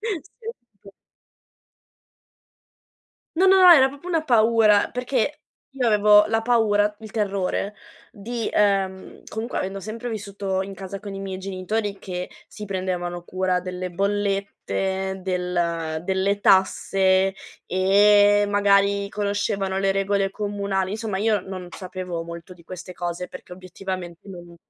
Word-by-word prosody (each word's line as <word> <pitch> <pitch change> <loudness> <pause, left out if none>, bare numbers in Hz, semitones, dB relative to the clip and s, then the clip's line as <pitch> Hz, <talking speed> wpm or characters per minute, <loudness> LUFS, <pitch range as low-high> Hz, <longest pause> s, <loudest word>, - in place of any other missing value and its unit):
Sì, 420 -8 -3 0.6
sì. 200 - -12 2.5
No, 375 +3 +3
no, 380 0 +6
no, 360 -1 +10
era 265 -5 +7
proprio 285 +6 -10
una 325 -3 +1
paura 225 -4 +4
perché 250 +3 -1 0.3
io 270 -3 -2
avevo 210 -1 +6
la 225 0 0
paura, 215 -3 +2
il 220 -1 -11
terrore 200 -1 -2 0.4
di 230 +1 -4
uhm, 195 -2 0
comunque 225 +2 -4
avendo 195 +1 -4
sempre 220 +4 -6
vissuto 200 -3 -3
in 195 - -8
casa 195 0 -7
con 200 0 -8
i 195 - -6
miei 195 -1 -5
genitori 195 +2 -3
che 180 -2 -5 0.2
si 210 - -9
prendevano 180 -2 -3
cura 185 0 -1
delle 180 0 -5
bollette, 195 0 -2
del 175 -3 -2
delle 190 +2 0
tasse 190 0 +3 0.3
e 205 +2 +5
magari 200 0 +3
conoscevano 200 -2 -1
le 195 0 +2
regole 195 0 0
comunali. 200 -2 -2
Insomma, 210 -3 -3
io 215 -1 +2
non 185 -1 -8
sapevo 180 -2 -6
molto 170 +1 -9
di 170 -2 -19
queste 180 +1 -9
cose 175 0 -4
perché - - -11
obiettivamente 185 -1 -7
non 175 -2 -11
195 Hz, 130 wpm, -23 LUFS, 185-210 Hz, 2.5 s, no